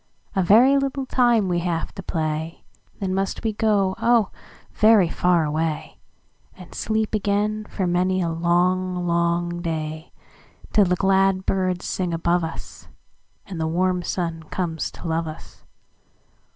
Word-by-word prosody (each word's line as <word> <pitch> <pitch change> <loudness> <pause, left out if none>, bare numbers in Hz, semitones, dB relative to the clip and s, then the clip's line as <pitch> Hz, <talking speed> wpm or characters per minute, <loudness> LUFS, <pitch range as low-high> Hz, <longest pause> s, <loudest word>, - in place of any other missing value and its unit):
"A 190 - +3
very 240 +10 +5
little 275 0 -2
time 240 -6 +2
we 175 -1 0
have 170 -1 -2
to - - -7
play, 160 -2 -3 0.4
Then 190 -2 -2
must 195 0 -2
we 220 -1 0
go, 205 -3 +1
oh, 235 -4 +3 0.4
very 215 -4 +5
far 175 -1 +2
away, 155 +1 -3 0.6
And 180 -2 -13
sleep 220 0 -1
again 210 +1 0
for 190 - -2
many 180 +1 +1
a 170 -2 0
long, 180 +2 +1
long 170 0 0
day, 155 -1 -4 0.6
Till 210 -2 +5
the 180 0 +1
glad 195 0 +2
birds 185 -2 -1
sing 180 -3 -2
above 170 +1 +1
us, 160 - -8 0.6
And 180 -4 -6
the 160 - 0
warm 180 +2 +1
sun 170 -2 -3
comes 165 -3 -2
to - - -9
love 165 0 -1
us. 155 - -11
180 Hz, 145 wpm, -23 LUFS, 170-200 Hz, 0.6 s, very